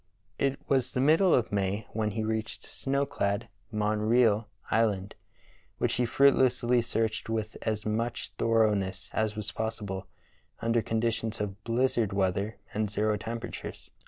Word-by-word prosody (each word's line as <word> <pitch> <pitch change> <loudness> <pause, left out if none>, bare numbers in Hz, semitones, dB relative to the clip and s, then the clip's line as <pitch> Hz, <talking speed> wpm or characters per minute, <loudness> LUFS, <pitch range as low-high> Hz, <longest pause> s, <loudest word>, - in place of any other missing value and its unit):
It 140 0 +1
was 130 -3 +1
the - - 0
middle 160 +7 +5
of 120 - +3
May 100 +1 0
when 110 -1 0
he 110 +1 -2
reached 110 0 -3
snow 140 +1 -1
clad 100 -3 -1 0.2
Montreal 110 +1 +2 0.2
Island, 105 -3 +1 0.6
which - - +1
he 125 -1 +1
fruitlessly 125 -1 +4
searched 115 -1 -1
with 110 -1 -2
as 110 -2 -2
much 115 +2 -2
thoroughness 105 -5 +1
as 110 -1 0
was 105 +1 -4
possible 105 -4 -3 0.5
under 115 +1 +2
conditions 115 0 -1
of 105 0 -4
blizzard 115 -3 +1
weather 100 +2 0 0.2
and 105 0 0
zero 105 +1 +1
temperatures. 115 +3 -6
110 Hz, 135 wpm, -29 LUFS, 105-120 Hz, 0.6 s, middle